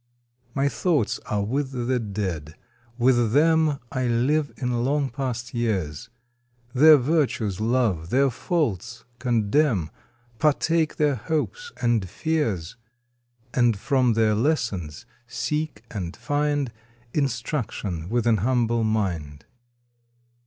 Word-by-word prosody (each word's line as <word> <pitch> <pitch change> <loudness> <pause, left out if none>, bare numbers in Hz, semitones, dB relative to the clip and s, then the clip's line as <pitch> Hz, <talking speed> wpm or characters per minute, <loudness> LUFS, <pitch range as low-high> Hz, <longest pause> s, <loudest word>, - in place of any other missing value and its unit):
My 140 0 +2
thoughts 150 - 0
are 105 -1 0
with 135 +6 -1
the 125 0 0
Dead, 95 -8 -4 0.4
with 120 -2 +3
them 160 0 +4
I 130 -2 -1
live 140 +6 +1
in 125 -2 -1
long 140 +1 0
past 130 0 -4
years, 95 -12 -2 0.6
Their 155 +3 +8
virtues 130 - 0
love, 110 -8 +1
their 135 +3 +3
faults 120 - -2 0.2
condemn, 115 - +1 0.5
Partake 155 +1 +2
their 150 -1 +2
hopes 160 - -3
and 115 -6 +1
fears, 115 - -2 0.8
And 120 -4 +3
from 130 +1 +2
their 110 -1 +3
lessons 105 - -1 0.2
seek 120 +1 -3
and 90 -5 -5
find 145 -3 0 0.4
Instruction 115 - -2
with 120 0 0
^n 115 -3 +3
humble 120 0 +1
mind. 85 -10 -2
120 Hz, 110 wpm, -24 LUFS, 105-145 Hz, 0.8 s, Their